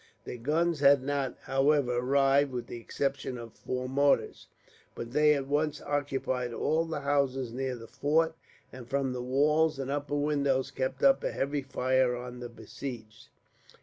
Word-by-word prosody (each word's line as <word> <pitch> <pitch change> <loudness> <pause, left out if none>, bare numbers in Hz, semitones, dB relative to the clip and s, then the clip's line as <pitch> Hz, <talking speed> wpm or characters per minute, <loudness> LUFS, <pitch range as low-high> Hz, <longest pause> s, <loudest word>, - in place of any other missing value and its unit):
Their - - -6
guns 160 +5 +1
had 140 -1 +5
not, 140 -2 -2
however, 135 -2 +2
arrived, 135 +2 +3
with 120 -2 -4
the 120 - -7
exception 135 +1 -3
of 115 -2 -9
four 130 0 -4
mortars; 140 +2 +1 0.5
but 115 0 -6
they 150 +1 +5
at 140 -2 -2
once 150 +1 0
occupied 135 -4 -2
all 160 +6 +1
the 160 -3 -4
houses 135 -4 0
near 130 0 -2
the 115 -1 -10
fort, 160 +6 +1 0.4
and 125 -2 -10
from 135 -2 0
the 125 - -4
walls 150 +4 +2
and 135 0 -3
upper 145 0 -2
windows 140 -3 +1
kept 130 -1 -3
up 270 -1 +5
a - - -1
heavy 140 +1 -1
fire 130 -2 +1
on 125 0 -7
the 120 -1 -6
besieged. 115 -3 -9
135 Hz, 165 wpm, -29 LUFS, 125-145 Hz, 0.5 s, had